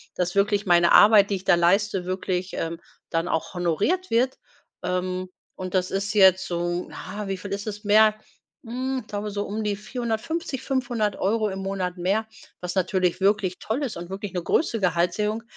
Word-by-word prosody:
dass 180 Hz, 0 st, -1 dB
wirklich 205 Hz, +1 st, +2 dB
meine 175 Hz, -1 st, +5 dB
Arbeit, 205 Hz, -1 st, +7 dB
die 200 Hz, -, +2 dB
ich 185 Hz, -, -13 dB
da 175 Hz, -, +5 dB
leiste 190 Hz, +2 st, +2 dB
wirklich, 185 Hz, 0 st, -2 dB
ähm, 165 Hz, +1 st, -3 dB, 0.3 s
dann 165 Hz, 0 st, -1 dB
auch 160 Hz, -, -2 dB
honoriert 200 Hz, -, 0 dB
wird. 250 Hz, +3 st, +2 dB, 0.5 s
Ähm, 185 Hz, 0 st, -2 dB, 0.3 s
und 185 Hz, -1 st, -6 dB
das 185 Hz, -1 st, +1 dB
ist 200 Hz, +1 st, -1 dB
jetzt 190 Hz, -2 st, +5 dB
so 175 Hz, 0 st, -2 dB
na, 210 Hz, 0 st, -7 dB
wie 195 Hz, -, -2 dB
viel 195 Hz, +1 st, -8 dB
ist 200 Hz, +2 st, -4 dB
es 210 Hz, +1 st, -5 dB
mehr? 215 Hz, +1 st, +5 dB, 0.5 s
Hm, 260 Hz, +3 st, -2 dB
ich -, -, -26 dB
glaube 205 Hz, 0 st, -4 dB
so 205 Hz, 0 st, -2 dB
um 215 Hz, +2 st, -3 dB
die 210 Hz, -1 st, 0 dB
450, 245 Hz, -, -3 dB
500 245 Hz, -6 st, -1 dB
Euro 215 Hz, +3 st, +1 dB
im 190 Hz, 0 st, -5 dB
Monat 190 Hz, -2 st, -3 dB
mehr, 195 Hz, +5 st, 0 dB, 0.3 s
was 180 Hz, +1 st, -5 dB
natürlich 185 Hz, -1 st, +1 dB
wirklich 195 Hz, -2 st, +2 dB
toll 240 Hz, +7 st, -2 dB
ist 255 Hz, -, -3 dB
und 170 Hz, +1 st, -7 dB
wirklich 195 Hz, +1 st, -6 dB
'ne 180 Hz, -2 st, -2 dB
große 230 Hz, -, +1 dB
Gehaltserhöhung. 190 Hz, +5 st, 0 dB
200 Hz, 185 wpm, -25 LUFS, 180-215 Hz, 0.5 s, Arbeit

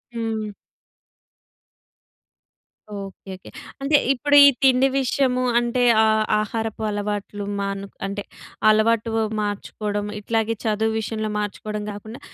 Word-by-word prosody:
హ్మ్. 220 Hz, -2 st, -3 dB, 2.5 s
Okay. 195 Hz, 0 st, -9 dB
Okay. 185 Hz, -, -14 dB, 0.3 s
అంటే 290 Hz, +2 st, +4 dB, 0.2 s
ఇప్పుడు 290 Hz, +3 st, +1 dB
ఈ -, -, +9 dB, 0.2 s
తిండి 260 Hz, 0 st, +5 dB
విషయము 255 Hz, -1 st, +1 dB, 0.2 s
అంటే 240 Hz, +1 st, 0 dB, 0.2 s
ఆహ్, 220 Hz, 0 st, +3 dB, 0.2 s
ఆహారపు 220 Hz, +1 st, -3 dB
అలవాట్లు 205 Hz, 0 st, -4 dB
మాను 200 Hz, 0 st, -3 dB, 0.2 s
అంటే, 200 Hz, +1 st, -4 dB, 0.5 s
అలవాటు 220 Hz, +1 st, +3 dB, 0.3 s
మార్చుకోవడం, 205 Hz, 0 st, -3 dB
ఇట్లాగే 225 Hz, +1 st, 0 dB
చదువు 220 Hz, +1 st, +1 dB
విషయంలో 215 Hz, 0 st, -3 dB
మార్చుకోవడం 210 Hz, 0 st, -4 dB
గాకుండా, 215 Hz, +3 st, -9 dB
215 Hz, 100 wpm, -22 LUFS, 205-230 Hz, 2.5 s, ఈ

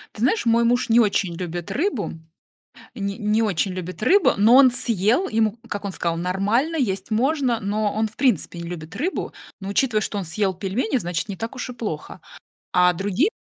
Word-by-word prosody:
Ты 215 Hz, -, -8 dB
знаешь, 265 Hz, -, +2 dB
мой 230 Hz, 0 st, +3 dB
муж 245 Hz, +1 st, +1 dB
не 230 Hz, +1 st, +5 dB
очень 200 Hz, -5 st, +1 dB
любит 175 Hz, -1 st, -5 dB
рыбу. 305 Hz, -, -1 dB, 0.8 s
Не 200 Hz, -4 st, -3 dB
не 215 Hz, 0 st, +1 dB
очень 195 Hz, -2 st, 0 dB
любит 185 Hz, +2 st, -7 dB
рыбу, 365 Hz, -, +4 dB
но 220 Hz, +5 st, +6 dB
он 265 Hz, -2 st, +8 dB
съел, 235 Hz, -, +2 dB
ему, 220 Hz, 0 st, +1 dB
как 205 Hz, -1 st, -5 dB
он 195 Hz, -, -3 dB
сказал, 170 Hz, -2 st, -2 dB
нормально, 200 Hz, -, 0 dB
есть 195 Hz, -8 st, -2 dB
можно, 255 Hz, 0 st, +1 dB
но 205 Hz, +1 st, -1 dB
он 220 Hz, 0 st, 0 dB
в 215 Hz, -, -20 dB
принципе 240 Hz, -, +1 dB
не 170 Hz, -, -6 dB
любит 165 Hz, -1 st, -8 dB
рыбу. 330 Hz, -, -2 dB, 0.3 s
Но, 195 Hz, -, -6 dB
учитывая, 215 Hz, +2 st, +1 dB
что 205 Hz, -, -3 dB
он 195 Hz, -, -3 dB
съел 190 Hz, +4 st, -1 dB
пельмени, 210 Hz, +7 st, -1 dB
значит, 175 Hz, -1 st, -3 dB
не 200 Hz, -, -5 dB
так 225 Hz, +6 st, -5 dB
уж 255 Hz, 0 st, -5 dB
и -, -, -6 dB
плохо. 210 Hz, -11 st, -6 dB, 0.5 s
А 180 Hz, 0 st, +4 dB
другие, 205 Hz, -, 0 dB
215 Hz, 195 wpm, -22 LUFS, 190-245 Hz, 0.8 s, он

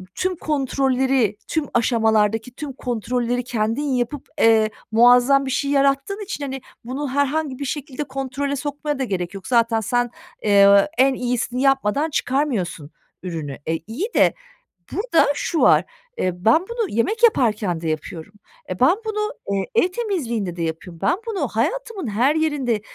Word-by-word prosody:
tüm 370 Hz, 0 st, -1 dB
kontrolleri, 265 Hz, -, 0 dB
tüm 315 Hz, -2 st, -1 dB
aşamalardaki 225 Hz, -1 st, +2 dB
tüm 290 Hz, -1 st, -6 dB
kontrolleri 245 Hz, 0 st, -2 dB
kendin 230 Hz, +1 st, -1 dB
yapıp, 260 Hz, 0 st, -2 dB, 0.2 s
eee, 220 Hz, -1 st, +5 dB, 0.2 s
muazzam 245 Hz, +4 st, +5 dB
bir 265 Hz, -, -3 dB
şey 280 Hz, +2 st, 0 dB
yarattığın 275 Hz, +8 st, +1 dB
için, 385 Hz, -7 st, -5 dB
hani, 270 Hz, -1 st, -5 dB, 0.2 s
bunu 270 Hz, +4 st, -4 dB
herhangi 285 Hz, 0 st, -1 dB
bir 285 Hz, -, -3 dB
şekilde 285 Hz, 0 st, -4 dB
kontrole 275 Hz, +1 st, -3 dB
sokmaya 290 Hz, 0 st, -3 dB
da -, -, 0 dB
gerek 185 Hz, -6 st, -3 dB
yok. 195 Hz, -1 st, -9 dB
Zaten 230 Hz, -2 st, +3 dB
sen, 245 Hz, +2 st, 0 dB, 0.3 s
eee, 200 Hz, -1 st, +6 dB
en 265 Hz, +1 st, +4 dB
iyisini 250 Hz, 0 st, -2 dB
yapmadan 270 Hz, +2 st, +2 dB
çıkarmıyorsun 245 Hz, -, -1 dB, 0.3 s
ürünü." 160 Hz, -6 st, -5 dB
E, 160 Hz, -, 0 dB
iyi 265 Hz, -, -3 dB
de -, -, +5 dB, 0.6 s
burada 400 Hz, -, +2 dB
şu 325 Hz, +2 st, -2 dB
var, -, -, +6 dB, 0.3 s
eee, 185 Hz, -, 0 dB
ben 230 Hz, +9 st, +5 dB
bunu 470 Hz, -4 st, -2 dB
yemek 425 Hz, -, -1 dB
yaparken 215 Hz, -, +2 dB
de 165 Hz, -, -2 dB
yapıyorum. 160 Hz, +4 st, -5 dB, 0.4 s
E, 185 Hz, -, -4 dB
ben 260 Hz, +8 st, +5 dB
bunu, 425 Hz, -1 st, -2 dB, 0.2 s
eee, 195 Hz, -1 st, 0 dB
ev 450 Hz, -6 st, +4 dB
temizliğinde 250 Hz, -, -2 dB
de 175 Hz, -, -5 dB
yapıyorum. 165 Hz, +1 st, -5 dB
Ben 345 Hz, -, +2 dB
bunu 430 Hz, -4 st, -1 dB
hayatımın 460 Hz, -, -2 dB
her 240 Hz, +8 st, +2 dB
yerinde 285 Hz, -9 st, 0 dB
255 Hz, 150 wpm, -21 LUFS, 220-290 Hz, 0.6 s, eee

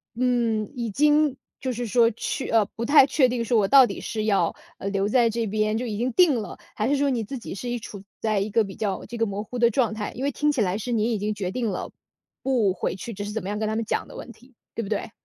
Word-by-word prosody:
嗯， 235 Hz, -4 st, 0 dB
已 235 Hz, -2 st, -3 dB
经 295 Hz, +2 st, +3 dB, 0.2 s
就 260 Hz, -, -2 dB
是 240 Hz, +1 st, -3 dB
说， 230 Hz, +1 st, +4 dB
去 250 Hz, +4 st, -4 dB
呃， 225 Hz, -2 st, +4 dB
不 230 Hz, -, -4 dB
太 285 Hz, +1 st, +7 dB
确 265 Hz, -2 st, +3 dB
定 240 Hz, -1 st, -1 dB
说 235 Hz, -, +2 dB
我 200 Hz, -, +2 dB
到 270 Hz, +3 st, +8 dB
底 -, -, -6 dB
是 215 Hz, -1 st, -3 dB
要， 195 Hz, -6 st, +2 dB, 0.2 s
呃， -, -, -4 dB
留 195 Hz, 0 st, 0 dB
在 235 Hz, +1 st, +3 dB
这 230 Hz, 0 st, -1 dB
边， 215 Hz, +1 st, 0 dB
就 250 Hz, -, -2 dB
已 215 Hz, -3 st, -3 dB
经 245 Hz, +2 st, 0 dB
定 350 Hz, -7 st, +5 dB
了。 205 Hz, -, -8 dB, 0.2 s
还 215 Hz, -, 0 dB
是 285 Hz, -, +3 dB
说 285 Hz, 0 st, +2 dB
你 235 Hz, -3 st, -1 dB
自 265 Hz, +6 st, -6 dB
己 235 Hz, -, -7 dB
是 245 Hz, +5 st, -5 dB
一 240 Hz, -, -1 dB
处 200 Hz, -2 st, -9 dB, 0.2 s
在 215 Hz, -2 st, +1 dB
一 200 Hz, +2 st, -1 dB
个 225 Hz, +2 st, +3 dB
比 195 Hz, -2 st, -8 dB
较 205 Hz, -3 st, -3 dB
这 235 Hz, -, -7 dB
个 225 Hz, -, +2 dB
模 205 Hz, 0 st, -4 dB
糊 250 Hz, -, -7 dB
的 235 Hz, -1 st, +5 dB
状 225 Hz, -2 st, +1 dB
态。 210 Hz, -1 st, -4 dB
因 255 Hz, -, -5 dB
为 285 Hz, -, +1 dB
听 295 Hz, +3 st, +1 dB
起 275 Hz, -6 st, 0 dB
来 190 Hz, 0 st, +1 dB
是 245 Hz, +3 st, -4 dB
您 230 Hz, 0 st, +1 dB
已 220 Hz, -, 0 dB
经 210 Hz, +1 st, -1 dB
决 190 Hz, -3 st, -3 dB
定 235 Hz, +1 st, -1 dB
了 185 Hz, -, -4 dB, 0.5 s
不 240 Hz, -8 st, +2 dB
回 -, -, -2 dB
去， 230 Hz, +5 st, -7 dB
只 205 Hz, 0 st, -5 dB
是 205 Hz, -, -5 dB
怎 220 Hz, +1 st, -3 dB
么 190 Hz, -, -4 dB
样 205 Hz, -, -2 dB
跟 215 Hz, -, -1 dB
他 215 Hz, -, -1 dB
们 225 Hz, -, 0 dB
讲 -, -, -2 dB
的 -, -, -12 dB
问 -, -, -8 dB
题， 250 Hz, +2 st, -20 dB, 0.2 s
对 -, -, -2 dB
不 200 Hz, -, -7 dB
对？ 210 Hz, 0 st, -2 dB
225 Hz, 310 characters per minute, -25 LUFS, 210-250 Hz, 0.5 s, 到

